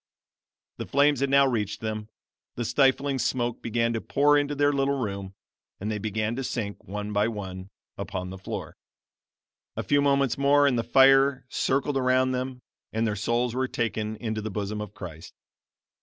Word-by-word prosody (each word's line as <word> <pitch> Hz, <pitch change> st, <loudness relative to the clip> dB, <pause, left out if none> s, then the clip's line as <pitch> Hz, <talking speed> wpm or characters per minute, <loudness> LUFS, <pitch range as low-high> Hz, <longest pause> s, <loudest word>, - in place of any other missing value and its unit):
The -, -, -5 dB
flames 140 Hz, 0 st, +3 dB
had 140 Hz, 0 st, +1 dB
now 140 Hz, 0 st, +6 dB
reached 110 Hz, -6 st, -1 dB
them; 110 Hz, -1 st, -4 dB, 0.5 s
the 120 Hz, -, -3 dB
stifling 135 Hz, +1 st, +2 dB
smoke 120 Hz, -1 st, -1 dB
began 115 Hz, 0 st, 0 dB
to 115 Hz, -, -2 dB
pour 145 Hz, +1 st, +3 dB
into 145 Hz, 0 st, +1 dB
their 145 Hz, 0 st, +3 dB
little 140 Hz, 0 st, +1 dB
room, 100 Hz, -5 st, -4 dB, 0.4 s
and 105 Hz, +3 st, -3 dB
they 105 Hz, -, -2 dB
began 110 Hz, +2 st, -2 dB
to 135 Hz, -, -2 dB
sink, 110 Hz, -5 st, -4 dB
one 105 Hz, +1 st, -5 dB
by 105 Hz, +1 st, +2 dB
one, 95 Hz, -4 st, -6 dB, 0.3 s
upon 90 Hz, 0 st, -4 dB
the 95 Hz, -, -8 dB
floor. 95 Hz, -, -6 dB, 1.0 s
A -, -, -3 dB
few 145 Hz, 0 st, +3 dB
moments 140 Hz, -2 st, +2 dB
more 145 Hz, +1 st, +5 dB
and 140 Hz, -3 st, +3 dB
the 115 Hz, -, 0 dB
fire 135 Hz, +1 st, +5 dB
circled 135 Hz, +1 st, 0 dB
around 130 Hz, 0 st, +2 dB
them, 125 Hz, 0 st, -4 dB, 0.3 s
and 110 Hz, +1 st, 0 dB
their 105 Hz, -2 st, 0 dB
souls 120 Hz, +4 st, 0 dB
were 130 Hz, +1 st, 0 dB
taken 110 Hz, -3 st, -2 dB
into 110 Hz, -1 st, -3 dB
the 110 Hz, -, -4 dB
bosom 105 Hz, +1 st, -3 dB
of 105 Hz, -1 st, -8 dB
Christ. 85 Hz, -3 st, -9 dB
120 Hz, 175 wpm, -26 LUFS, 105-135 Hz, 1.0 s, now